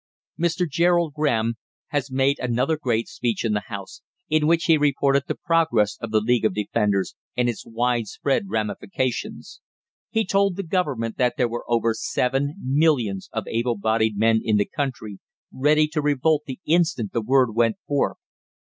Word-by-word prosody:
Mr. 170 Hz, +1 st, +1 dB
Gerald 170 Hz, 0 st, +2 dB
Graham 115 Hz, -7 st, 0 dB, 0.3 s
has 145 Hz, -2 st, -1 dB
made 135 Hz, +2 st, +1 dB
another 125 Hz, +5 st, 0 dB
great 120 Hz, -6 st, -1 dB
speech 120 Hz, -1 st, -2 dB
in 110 Hz, -, +1 dB
the 105 Hz, 0 st, -2 dB
House, 100 Hz, -5 st, -8 dB, 0.3 s
in 155 Hz, -1 st, +3 dB
which 165 Hz, +1 st, +3 dB
he 165 Hz, -3 st, +5 dB
reported 140 Hz, -2 st, +2 dB
the -, -, -2 dB
progress 160 Hz, -, +2 dB
of 115 Hz, -, -4 dB
the 110 Hz, 0 st, +3 dB
League 120 Hz, +1 st, +1 dB
of 110 Hz, -4 st, +1 dB
Defenders 105 Hz, -2 st, 0 dB, 0.2 s
and 125 Hz, 0 st, +2 dB
its 120 Hz, -, -3 dB
wide 120 Hz, 0 st, 0 dB
spread 170 Hz, +8 st, -1 dB
ramifications. 115 Hz, -, -3 dB, 0.5 s
He 225 Hz, 0 st, 0 dB
told 195 Hz, 0 st, +2 dB
the 195 Hz, -, -4 dB
Government 145 Hz, -, -1 dB
that 125 Hz, -1 st, +1 dB
there 125 Hz, -, +2 dB
were 120 Hz, +1 st, -5 dB
over 115 Hz, -1 st, +2 dB
seven 135 Hz, +6 st, -1 dB
millions 130 Hz, -8 st, +1 dB
of 110 Hz, -, -3 dB
able 115 Hz, 0 st, -1 dB
bodied 110 Hz, 0 st, +1 dB
men 110 Hz, +1 st, +3 dB
in 110 Hz, -2 st, +2 dB
the 100 Hz, -, +2 dB
country 120 Hz, -8 st, -4 dB, 0.3 s
ready 150 Hz, +3 st, +3 dB
to 155 Hz, -1 st, -1 dB
revolt 150 Hz, +1 st, +1 dB
the 130 Hz, -, -6 dB
instant 160 Hz, -, +1 dB
the 115 Hz, -, 0 dB
word 125 Hz, 0 st, +2 dB
went 115 Hz, -1 st, +2 dB
forth. 145 Hz, -1 st, 0 dB
125 Hz, 170 wpm, -23 LUFS, 115-155 Hz, 0.5 s, he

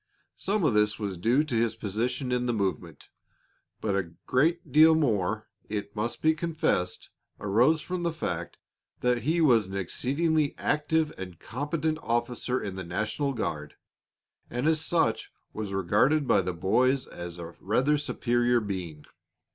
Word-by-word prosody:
Some 200 Hz, 0 st, 0 dB
of 145 Hz, -7 st, +3 dB
this 105 Hz, 0 st, +3 dB
was 100 Hz, -3 st, -3 dB
due 115 Hz, -, +2 dB
to 155 Hz, -6 st, -3 dB
his 115 Hz, 0 st, +1 dB
position 125 Hz, +5 st, -2 dB
in 125 Hz, 0 st, 0 dB
the 120 Hz, -, +1 dB
movement; 95 Hz, -5 st, -3 dB, 0.7 s
but 100 Hz, -3 st, 0 dB
a 95 Hz, -4 st, -1 dB, 0.2 s
great 165 Hz, +7 st, +1 dB
deal 160 Hz, +1 st, +7 dB
more, 110 Hz, -, 0 dB, 0.2 s
it 100 Hz, -1 st, -4 dB
must 115 Hz, +2 st, -3 dB
be 160 Hz, 0 st, +5 dB
confessed 155 Hz, -, -1 dB, 0.3 s
arose 120 Hz, +10 st, +3 dB
from 180 Hz, +2 st, -4 dB
the 170 Hz, -1 st, 0 dB
fact 85 Hz, -, -4 dB, 0.4 s
that 125 Hz, -1 st, +2 dB
he 165 Hz, +5 st, +1 dB
was 120 Hz, -10 st, +4 dB
an 95 Hz, +1 st, -5 dB
exceedingly 145 Hz, -, 0 dB
active 155 Hz, +1 st, +1 dB
and 90 Hz, -2 st, -7 dB
competent 150 Hz, +5 st, -2 dB
officer 120 Hz, +2 st, -1 dB
in 95 Hz, -2 st, -5 dB
the 95 Hz, -, -4 dB
national 110 Hz, -, -2 dB
guard, 75 Hz, -, -4 dB, 0.7 s
and 125 Hz, +3 st, -2 dB
as 160 Hz, 0 st, +2 dB
such 160 Hz, -11 st, +1 dB, 0.2 s
was 105 Hz, -2 st, -4 dB
regarded 110 Hz, -, +2 dB
by -, -, +4 dB
the 90 Hz, 0 st, -2 dB
boys 125 Hz, +10 st, +2 dB
as 85 Hz, 0 st, -8 dB
a 85 Hz, 0 st, -8 dB
rather 130 Hz, +9 st, +2 dB
superior 120 Hz, -4 st, +1 dB
being. 90 Hz, -8 st, -5 dB
120 Hz, 155 wpm, -28 LUFS, 100-150 Hz, 0.7 s, deal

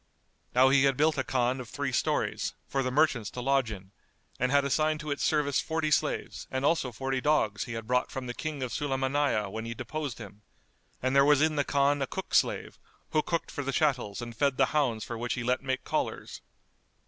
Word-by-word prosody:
Now 130 Hz, +1 st, +6 dB
he 140 Hz, 0 st, +5 dB
had 135 Hz, -2 st, +2 dB
built 155 Hz, -1 st, +2 dB
a -, -, +1 dB
Khan 130 Hz, 0 st, 0 dB
of 120 Hz, -, -10 dB
three -, -, -3 dB
stories, -, -, 0 dB
for 135 Hz, -, 0 dB
the 130 Hz, -, -1 dB
merchants 130 Hz, -6 st, +2 dB
to -, -, -8 dB
lodge 135 Hz, -1 st, +2 dB
in, 95 Hz, -3 st, -9 dB, 0.5 s
and 125 Hz, +1 st, +1 dB
had 140 Hz, 0 st, +4 dB
assigned 155 Hz, +2 st, +1 dB
to 155 Hz, -1 st, -5 dB
its 145 Hz, -, -2 dB
service 145 Hz, -3 st, +2 dB
forty 160 Hz, -1 st, -1 dB
slaves -, -, -1 dB
and 130 Hz, +1 st, -2 dB
also 145 Hz, -5 st, +2 dB
forty 135 Hz, +3 st, -2 dB
dogs 135 Hz, -9 st, +1 dB
he 120 Hz, -, -6 dB
had 115 Hz, -1 st, -5 dB
brought 125 Hz, +2 st, +1 dB
from 130 Hz, -1 st, -5 dB
the 120 Hz, -, -4 dB
King 150 Hz, -1 st, -4 dB
of 125 Hz, -, -3 dB
the -, -, -2 dB
Sulaymániyah,[FN#213] 135 Hz, -6 st, 0 dB
when 110 Hz, +2 st, -5 dB
he 115 Hz, 0 st, -5 dB
deposed 150 Hz, -1 st, -4 dB
him; 105 Hz, -2 st, -11 dB, 0.6 s
and 130 Hz, +1 st, +1 dB
there 140 Hz, -, +7 dB
was 145 Hz, 0 st, +5 dB
in 155 Hz, +1 st, +2 dB
the 145 Hz, -, +2 dB
Khan 140 Hz, 0 st, +2 dB
a 135 Hz, -, 0 dB
cook -, -, -6 dB
slave, -, -, +1 dB, 0.3 s
who 155 Hz, -, +3 dB
cooked 170 Hz, +2 st, -2 dB
for 145 Hz, -, -4 dB
the 135 Hz, -, -2 dB
chattels 125 Hz, -7 st, 0 dB
and 120 Hz, -1 st, -8 dB
fed 140 Hz, +2 st, +1 dB
the 135 Hz, -, +5 dB
hounds 125 Hz, -8 st, +1 dB
for 120 Hz, -1 st, -6 dB
which 120 Hz, +1 st, -2 dB
he 120 Hz, -, -3 dB
let 125 Hz, +1 st, +1 dB
make 130 Hz, -1 st, -2 dB
collars. -, -, -3 dB
135 Hz, 225 wpm, -29 LUFS, 120-145 Hz, 0.6 s, there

